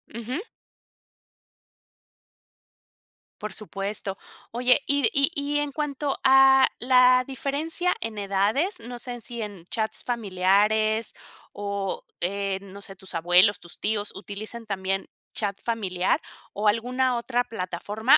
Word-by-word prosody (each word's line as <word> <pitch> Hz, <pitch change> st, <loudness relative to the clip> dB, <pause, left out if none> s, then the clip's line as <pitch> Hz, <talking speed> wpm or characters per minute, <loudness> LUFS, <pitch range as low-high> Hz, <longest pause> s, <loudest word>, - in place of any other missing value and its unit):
Ujú. 245 Hz, -, -3 dB, 3.0 s
Por 215 Hz, 0 st, -5 dB
supuesto. 195 Hz, -1 st, -4 dB, 0.3 s
Oye, 250 Hz, +4 st, +3 dB
y 280 Hz, -5 st, +4 dB
y 280 Hz, +3 st, +4 dB
y 290 Hz, -1 st, -1 dB
en 290 Hz, -1 st, -2 dB
cuanto 290 Hz, -1 st, -2 dB
a 265 Hz, 0 st, +7 dB
la 255 Hz, 0 st, +5 dB
diferencia 300 Hz, +7 st, -1 dB
en 225 Hz, -1 st, -4 dB
edades, 205 Hz, -, 0 dB
no 240 Hz, +1 st, -8 dB
sé 245 Hz, -1 st, -6 dB
si 235 Hz, +1 st, -6 dB
en 205 Hz, -5 st, -6 dB
chats 220 Hz, +1 st, -2 dB
familiares 215 Hz, 0 st, +1 dB, 0.4 s
o, 200 Hz, -1 st, -3 dB, 0.2 s
eh, 195 Hz, +1 st, 0 dB
no 200 Hz, 0 st, -11 dB
sé, 195 Hz, -1 st, -9 dB
¿tus 190 Hz, -2 st, -10 dB
abuelos, 175 Hz, +4 st, +5 dB
tus 175 Hz, -, -12 dB
tíos 210 Hz, -1 st, -1 dB
utilizan 215 Hz, +4 st, -7 dB
también 195 Hz, -1 st, -2 dB, 0.3 s
chat 200 Hz, -2 st, -1 dB
familiar 190 Hz, -6 st, 0 dB, 0.3 s
o 210 Hz, +1 st, -1 dB
alguna 250 Hz, +4 st, +1 dB
otra 240 Hz, +1 st, 0 dB
plataforma, 215 Hz, -, +2 dB
220 Hz, 120 wpm, -25 LUFS, 200-255 Hz, 3.0 s, a